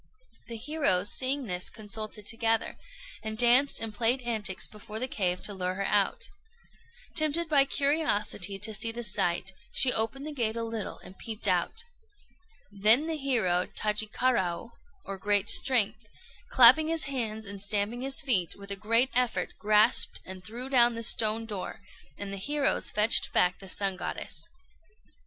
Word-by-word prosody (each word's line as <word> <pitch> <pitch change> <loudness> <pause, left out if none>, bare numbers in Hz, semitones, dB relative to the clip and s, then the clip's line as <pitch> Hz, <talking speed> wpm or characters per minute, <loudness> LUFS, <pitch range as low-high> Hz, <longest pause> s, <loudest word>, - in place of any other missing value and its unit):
The 230 - -7
heroes, 230 -8 -1
seeing 265 +1 +1
this, 180 -3 0
consulted 215 -1 -8
together, 225 0 -1 0.5
and 220 0 -6
danced 245 +4 +3
and 225 -1 -5
played 240 +4 0
antics 215 -5 -2
before 210 0 -8
the 255 +3 -3
cave 180 -7 -2
to 205 - -4
lure 185 -1 -3
her 195 +1 -3
out. 200 -1 0 0.8
Tempted 315 +1 +4
by 285 -3 +4
curiosity 275 - 0
to 215 +2 -2
see 225 +2 +2
the 240 +1 -6
sight, 190 -2 0 0.2
she 255 -1 +4
opened 225 +6 0
the 305 - -6
gate 230 -5 -2
a 230 - -3
little 225 -2 -6
and 190 - -14
peeped 220 -2 -4
out. 185 - 0 0.9
Then 215 +8 +4
the 325 0 -3
hero 225 - 0
Tajikaraô, 215 -2 -1 0.3
or 195 -1 -7
"Great 205 0 +1
Strength," 220 -4 +2 0.4
clapping 315 -9 +7
his 325 0 +2
hands 225 -5 -3
and 200 -1 -8
stamping 205 +4 -1
his 270 +1 0
feet, 195 - +3
with 200 0 -10
a - - 0
great 230 +6 +1
effort 250 -2 -1
grasped 215 +2 +3
and 185 -1 -9
threw 235 +6 -7
down 240 -3 +3
the 230 - -6
stone 225 0 -1
door, 205 -4 -7 0.4
and 200 -1 -6
the - - -4
heroes 285 +7 -1
fetched 210 +2 +5
back 180 0 +2
the 195 - -7
Sun 195 -1 0
Goddess. 335 - -4
220 Hz, 160 wpm, -28 LUFS, 200-255 Hz, 0.9 s, clapping